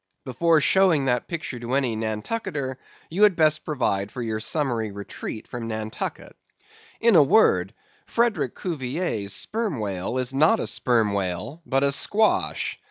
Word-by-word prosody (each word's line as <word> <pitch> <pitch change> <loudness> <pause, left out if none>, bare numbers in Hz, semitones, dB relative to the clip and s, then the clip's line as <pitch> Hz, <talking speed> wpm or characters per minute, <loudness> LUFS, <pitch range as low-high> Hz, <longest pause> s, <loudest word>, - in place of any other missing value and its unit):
Before 160 +6 +2
showing 170 -3 +3
that 125 -2 0
picture 160 -7 -5
to 120 +2 -5
any 130 -5 +1
Nantucketer, 130 - -3 0.3
you 185 +5 -2
had 210 -3 +6
best 155 -2 +3
provide 105 -9 -1
for 125 - -5
your 110 -1 -2
summary 120 -5 -1
retreat 100 +2 -7
from 120 -2 -6
Nantucket. 110 -1 -5 0.6
In 230 -3 +4
a 160 - +8
word, 110 - +3 0.3
Frederick 235 -1 0
Cuvier's 135 - -3
Sperm 215 - -2
Whale 100 +2 -3
is 130 0 -1
not 155 +11 +4
a - - -2
Sperm 115 -5 +1
Whale, 95 - -3
but 135 0 +1
a 140 - +3
squash. 215 +9 +1
130 Hz, 150 wpm, -24 LUFS, 110-165 Hz, 0.6 s, a